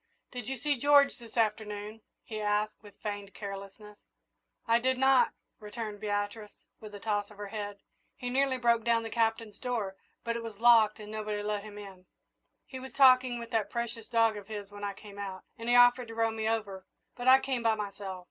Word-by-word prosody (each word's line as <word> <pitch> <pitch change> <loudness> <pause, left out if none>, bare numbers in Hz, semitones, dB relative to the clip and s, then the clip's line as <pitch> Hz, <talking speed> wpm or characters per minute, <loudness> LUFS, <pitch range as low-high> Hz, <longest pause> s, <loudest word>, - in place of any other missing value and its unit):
"Did 245 -4 -6
you 270 0 -3
see 285 +2 0
George 285 0 +5
this 235 0 -13
afternoon?" 215 -1 -1 0.2
he 215 -1 -6
asked, 210 +1 0
with 205 -2 -15
feigned 205 -1 -5
carelessness. 200 +1 -8 0.7
"I 230 +1 +4
did 260 +1 +1
not," 265 0 +5 0.3
returned 210 -1 -6
Beatrice, 205 +1 -3 0.2
with 210 -1 -10
a - - -8
toss 205 -1 -1
of 210 - -15
her 205 -1 -6
head. 205 -1 -5 0.4
"He 245 0 -4
nearly 265 0 +2
broke 235 -2 +2
down 230 0 +2
the 225 - -6
Captain's 225 -2 0
door, 230 -7 -2 0.3
but 230 0 -2
it 235 - -3
was 225 -3 -7
locked 225 -2 +5
and 210 0 -9
nobody 210 -1 -3
let 210 -1 -1
him 210 0 -10
in. 195 -3 -11 0.6
He 260 - -8
was 265 +1 -9
talking 255 -2 +6
with 235 -1 -8
that 215 -3 0
precious 235 -1 -4
dog 225 -2 +3
of 200 -1 -9
his 205 -2 -7
when 205 0 -10
I 200 -1 -2
came 205 0 -12
out, 190 -2 -6 0.2
and 230 +1 -4
he 245 - +5
offered 245 0 +6
to 225 - -9
row 225 0 +2
me 220 0 -1
over, 200 -4 -3 0.3
but 245 +1 -5
I 260 +1 +9
came 265 -2 -2
by 225 -1 +3
myself." 200 -2 -5
220 Hz, 205 wpm, -30 LUFS, 205-235 Hz, 0.7 s, I